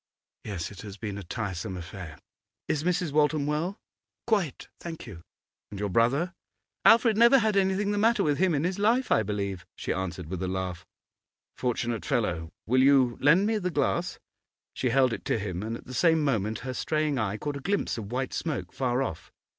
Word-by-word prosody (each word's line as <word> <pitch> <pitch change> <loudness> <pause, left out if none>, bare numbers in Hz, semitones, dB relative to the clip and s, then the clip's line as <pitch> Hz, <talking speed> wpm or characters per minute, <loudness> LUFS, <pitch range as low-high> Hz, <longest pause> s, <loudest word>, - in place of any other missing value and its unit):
'Yes; 95 -5 -4
it 100 - -10
has 105 -3 -9
been 100 -1 -5
a - - -7
tiresome 95 -2 -4
affair. 85 -1 -8 0.5
Is 150 -1 0
Mrs. 175 -2 0
Waltham 150 0 +2
well?' 155 +7 -1 0.5
'Quite, 200 - 0
thank 165 -2 -7
you.' 95 -9 -10 0.5
'And 100 - -7
your 105 0 -1
brother?' 135 - +2 0.5
'Alfred 225 -1 +6
never 235 +4 +7
had 220 -4 +2
anything 195 +1 +2
the 205 - 0
matter 230 +3 +3
with 145 -2 +1
him 185 -3 +3
in 145 - 0
his 180 +3 -1
life, 235 +5 +2
I - - +5
believe,' 100 -3 -3
she - - -2
answered, 95 -2 -4
with 90 +3 -5
a 95 - -1
laugh. 90 -1 -4 0.7
'Fortunate 120 -2 -1
fellow! 90 - -1
Will 130 +3 +3
you 130 -3 +5
lend 165 +8 +5
me 220 0 +1
the 180 -2 -1
glass?' 170 +3 0 0.6
She 130 - -1
held 130 -1 +3
it - - -5
to - - +1
him, 95 -4 -4
and 115 +2 -3
at - - -15
the 130 - -9
same 160 +2 +3
moment 110 -6 0
her 130 - -3
straying 155 0 0
eye 110 -1 -1
caught 145 +4 -3
a - - -6
glimpse 195 +8 -1
of 105 0 -7
white 130 +1 -2
smoke, 155 -4 -3
far 130 0 0
off. 80 -11 -6
130 Hz, 195 wpm, -28 LUFS, 100-170 Hz, 0.7 s, never